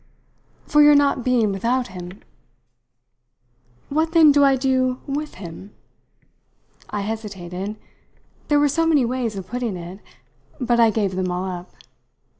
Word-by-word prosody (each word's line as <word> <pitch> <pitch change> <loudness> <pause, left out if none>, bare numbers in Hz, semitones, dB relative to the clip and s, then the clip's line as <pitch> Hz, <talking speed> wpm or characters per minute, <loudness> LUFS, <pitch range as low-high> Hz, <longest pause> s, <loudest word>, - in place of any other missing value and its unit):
"For 295 - +4
your 295 0 +7
not 280 -3 +2
being 235 -4 +2
without 235 +5 -1
him." 180 +1 -10 1.7
"What 315 +3 0
then 320 -3 +7
do 285 0 +4
I 275 -1 +5
do 255 -1 0
with 295 +2 -4
him?" 185 +2 -10 1.1
I 205 - -3
hesitated 200 -2 -5 0.7
there 295 -1 +3
were 290 - +4
so 330 +3 +1
many 295 -6 +3
ways 240 -3 -2
of 190 -2 -6
putting 240 -2 -4
it; 175 +3 -9 0.6
but 240 -2 +1
I 230 -1 +6
gave 205 -3 -1
them 185 0 -1
all 180 +1 -2
up. 180 -1 -6
235 Hz, 140 wpm, -22 LUFS, 190-275 Hz, 1.7 s, your